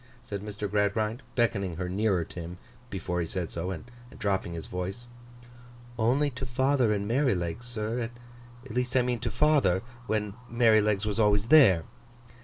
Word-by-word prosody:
said 100 -4 -5
Mr. 105 0 -4
Gradgrind, 105 +4 0
beckoning 100 -7 +1
her 90 +2 -3
nearer 95 -1 +1
to 90 - -9
him 85 +1 -7 0.3
before 90 -3 -3
he 85 - -2
said 90 -1 -3
so, 85 +2 -3
and 95 +2 -5 0.3
dropping 95 -4 -1
his 80 - -6
voice. 95 +6 -5 0.9
'Only 135 +6 +2
to 125 +1 -7
father 130 -1 +2
and 100 -1 -1
Merrylegs, 115 - 0
sir. 115 0 -2 0.6
At 135 - -9
least 125 +2 -1
I 125 - +4
mean 125 -1 -1
to 120 - -2
father, 115 -12 +3 0.2
when 105 -2 -1 0.2
Merrylegs 110 -3 +3
was 105 +1 -1
always 105 0 +3
there. 115 - +7
105 Hz, 160 wpm, -28 LUFS, 95-120 Hz, 0.9 s, there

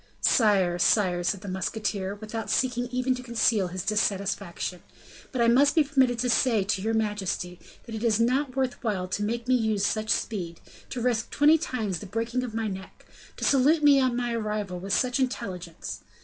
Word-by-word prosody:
"Sire, 195 -6 +3
sire," 175 -1 +2
said 185 +2 -1
the 205 - -9
musketeer, 195 +1 -2
without 215 +1 -6
seeking 245 -2 +1
even 255 +1 0
to 250 - -6
conceal 230 -5 +1
his 180 0 -5
dissatisfaction; 200 -4 -1 0.5
"but 255 - -1
I - - +4
must 280 +5 +4
be 315 - +5
permitted 265 -4 +2
to 250 +1 0
say 225 -3 +3
to 195 0 -1
your 225 +2 0
majesty, 200 -5 -2 0.3
that 230 - -9
it 220 +1 -4
is 225 -2 +2
not 255 +3 +1
worth 260 -2 -2
while 195 -5 -1
to 195 - -2
make 230 +3 -2
me 255 - +3
use 220 -4 +1
such 215 +1 -1
speed, 175 -9 -2 0.3
to 250 - -4
risk 235 -3 0
twenty 300 +2 +4
times 215 - -3
the 205 - -9
breaking 230 +5 -2
of 240 -3 -5
my 225 -1 -1
neck, 190 -2 -8 0.3
to - - -2
salute 290 +4 +4
me 285 -2 +7
on 255 -2 +1
my 240 -1 -1
arrival 210 -5 -3
with 195 +2 -6
such 255 +5 +1
intelligence. 185 -10 -4
220 Hz, 190 wpm, -26 LUFS, 195-250 Hz, 0.5 s, me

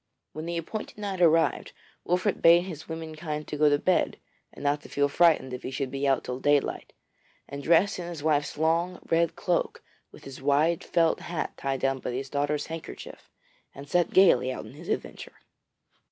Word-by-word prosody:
When 155 +2 -6
the 170 0 -2
appointed 210 +8 -6
night 200 -3 -4
arrived 165 -3 +3 0.3
Wolfert 180 +3 0
bade 170 +1 +7
his 165 -6 -8
women 160 -1 -6
kind 155 -1 -5
go 150 0 +2
to 145 - +3
bed 185 +5 +1 0.3
and - - -12
not 145 +1 +1
to - - -13
feel 145 0 +1
frightened 150 -4 +3
if 125 - -5
he - - -5
should 135 0 -3
be 140 +1 -1
out 135 -2 +2
till 125 0 -5
daylight; 145 0 +1 0.6
and 140 0 -7
dressed 175 +7 +3
in 175 - -5
his 165 -4 -7
wife's 150 -2 0
long, 165 +3 +1
red 165 0 +2
cloak, 175 -2 -1 0.3
with - - -15
his 135 -1 -10
wide 150 +4 +2
felt 165 -2 +2
hat 170 -2 -4
tied 135 -1 -3
down 135 0 0
by 125 - -4
his 135 +2 -5
daughter's 145 +1 -1
handkerchief, 165 0 -9 0.5
he 140 - -9
set 175 +3 +1
gaily 185 -8 +5
out - - -6
on - - -12
his - - -11
adventure. - - -4
155 Hz, 190 wpm, -27 LUFS, 140-170 Hz, 0.6 s, bade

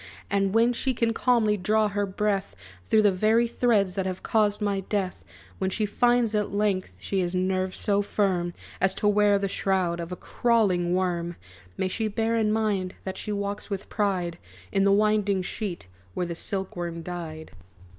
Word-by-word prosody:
And 195 -1 +2
when 230 +2 +4
she 260 +2 -1
can 230 -1 +1
calmly 225 -3 +2
draw 215 +3 +2
her 205 0 -1
breath 195 - -1 0.3
Through 215 - +4
the 205 - +5
very 220 +5 +3
threads 215 -6 +2
that 190 -1 -1
have 185 -1 -5
caused 210 -2 +2
my 205 -2 0
death; 195 -1 -3 0.4
When 190 - 0
she 210 +3 0
finds 240 +1 +2
at 210 -1 0
length, 200 -2 0
she 195 - -2
has 180 0 -1
nerves 185 0 0
so 205 -1 +2
firm, 185 -4 0 0.3
As 190 0 +2
to 210 - 0
wear 205 0 +4
the 195 0 -1
shroud 185 -3 0
of 170 +1 -5
a - - -3
crawling 185 -7 +1
worm, 175 -2 -1 0.4
May 190 - 0
she 220 +4 -1
bear 225 +2 0
in 220 -2 +2
mind 205 -4 0
that 190 0 -5
she 210 - -4
walks 200 +1 -3
with 200 -1 -4
pride 185 -5 -1 0.3
In 195 -1 +2
the 200 - +5
winding 205 -2 +2
sheet 195 -2 -4 0.3
where 180 - -1
the 170 - -4
silk 190 +3 -3
worm 170 -1 -4
died!" 165 -3 -6
200 Hz, 185 wpm, -26 LUFS, 185-215 Hz, 0.4 s, the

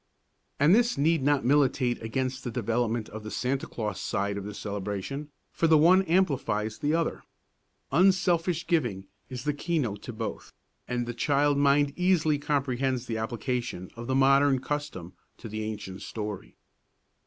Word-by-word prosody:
And 150 +5 +5
this 235 -2 +3
need 160 +2 +2
not 145 -1 +2
militate 130 -2 +2
against 130 +3 -2
the - - -3
development 115 -1 -1
of 110 - -7
the 110 - -7
Santa 130 +4 -2
Claus 105 -4 -4
side 100 +1 -1
of 100 -1 -5
the 105 - -6
celebration, 105 +9 -4 0.2
for 165 - +1
the 160 -1 +6
one 175 +5 +6
amplifies 135 - 0
the 150 +1 +1
other. 165 -1 -1 0.7
Unselfish 180 -2 +3
giving 120 - 0 0.2
is 125 -2 -6
the 150 0 0
keynote 140 - -2
to - - -7
both, 110 -1 -6 0.4
and 120 -1 -1
the 120 - -4
child 145 +4 +2
mind 140 0 +3
easily 170 -5 +2
comprehends 135 -3 -1
the 115 -2 -3
application 120 -4 -3
of 120 0 -7
the 130 - 0
modern 135 +1 +5
custom 135 - -4 0.2
to 115 - -9
the 110 0 -5
ancient 105 -3 -6
story. 105 -3 -6
130 Hz, 155 wpm, -28 LUFS, 110-150 Hz, 0.7 s, the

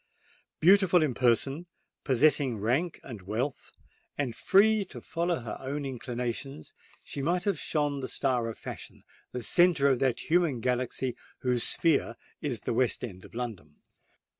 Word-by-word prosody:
Beautiful 180 -1 +5
in 145 -5 0
person, 135 +7 +1 0.4
possessing 135 -2 +3
rank 130 - 0
and 115 -6 -8
wealth, 115 +9 -3 0.5
and 130 -6 -2
free 210 - +4
to - - -10
follow 170 -2 -2
her 115 -2 -6
own 140 +2 -4
inclinations, 125 - -5 0.3
she 140 - -5
might 175 +5 0
have 200 -7 0
shone 145 -2 -1
the 130 - -4
star 125 -4 0
of 115 - -7
fashion—the 125 - -9
centre 170 -1 +4
of 130 -3 +2
that 130 -3 +1
human 165 -7 +3
galaxy 125 +1 -1 0.3
whose 125 -2 +1
sphere 145 -8 +2 0.3
is 125 -8 -2
the - - -2
West 125 +1 +1
End 95 -6 -7
of - - -15
London. 105 -12 -6
130 Hz, 145 wpm, -29 LUFS, 120-155 Hz, 0.5 s, Beautiful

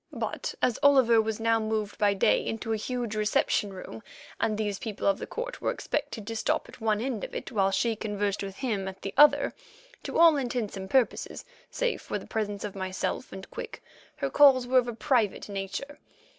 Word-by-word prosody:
But - - -4
as 245 - +2
Oliver 260 -6 +6
was 220 0 -3
now 225 0 +2
moved 215 -1 -2
by 205 -1 +3
day 195 - +3
into 225 0 -3
a - - +2
huge 235 0 -3
reception 210 -1 +1
room, 185 -12 -9 0.4
and 215 -1 0
these 205 -2 -2
people 215 -3 -5
of 295 - +3
the - - -6
court - - -5
were - - 0
expected 215 -4 -3
to 225 +2 -5
stop 220 - 0
at - - -14
one 215 -2 +1
end 240 -3 -3
of - - -6
it - - -5
while 195 -3 +2
she 220 +4 +1
conversed 205 -2 -2
with 195 -1 -5
him 210 -7 -2
at 190 0 -8
the 195 - -4
other, 295 +2 +6 0.5
to - - -4
all 330 -2 +7
intents 245 -6 -2
and 190 0 -6
purposes, 260 0 0 0.2
save - - -1
for - - -3
the - - -9
presence 205 -3 -3
of 205 -2 -4
myself 190 -1 -3
and 190 0 -9
Quick, 485 -1 -7 0.3
her - - -3
calls 270 -4 +6
were 255 +1 +4
of 245 - -2
a 240 - -3
private 235 -5 +1
nature. 200 +9 -5
220 Hz, 205 wpm, -28 LUFS, 200-255 Hz, 0.5 s, all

